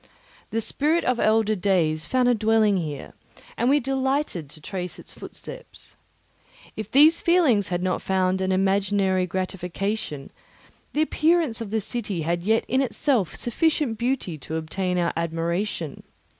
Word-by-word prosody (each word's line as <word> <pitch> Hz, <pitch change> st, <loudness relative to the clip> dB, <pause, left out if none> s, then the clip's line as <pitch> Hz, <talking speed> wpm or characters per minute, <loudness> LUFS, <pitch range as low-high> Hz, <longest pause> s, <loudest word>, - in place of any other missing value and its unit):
The 225 Hz, -, -1 dB
spirit 305 Hz, +9 st, +1 dB
of 250 Hz, -1 st, +1 dB
elder 215 Hz, 0 st, +3 dB
days 170 Hz, -5 st, +1 dB
found 255 Hz, -1 st, +2 dB
a 245 Hz, -, +5 dB
dwelling 220 Hz, -2 st, +3 dB
here, 150 Hz, -5 st, -5 dB, 0.4 s
and 240 Hz, -, +1 dB
we 290 Hz, +2 st, +5 dB
delighted 265 Hz, -, -1 dB
to 155 Hz, -, -13 dB
trace 180 Hz, +3 st, -5 dB
its -, -, -11 dB
footsteps. -, -, -10 dB, 0.8 s
If 215 Hz, -1 st, -5 dB
these 300 Hz, +7 st, +6 dB
feelings 295 Hz, -, +3 dB
had 175 Hz, +1 st, -2 dB
not 185 Hz, -1 st, 0 dB
found 190 Hz, 0 st, +1 dB
an 190 Hz, 0 st, 0 dB
imaginary 195 Hz, -1 st, +2 dB
gratification, 185 Hz, -3 st, -3 dB, 0.6 s
the 305 Hz, -, +3 dB
appearance 315 Hz, -6 st, +1 dB
of 225 Hz, -, -5 dB
the 220 Hz, +2 st, 0 dB
city 205 Hz, -6 st, -3 dB
had 170 Hz, +2 st, -1 dB
yet 220 Hz, +5 st, +1 dB
in 260 Hz, +3 st, +2 dB
itself 250 Hz, -, 0 dB
sufficient 265 Hz, -2 st, 0 dB
beauty 235 Hz, -, -1 dB
to 155 Hz, +4 st, -6 dB
obtain 180 Hz, +3 st, -2 dB
our 170 Hz, -1 st, +1 dB
admiration. 170 Hz, 0 st, -2 dB
205 Hz, 145 wpm, -24 LUFS, 180-250 Hz, 0.8 s, these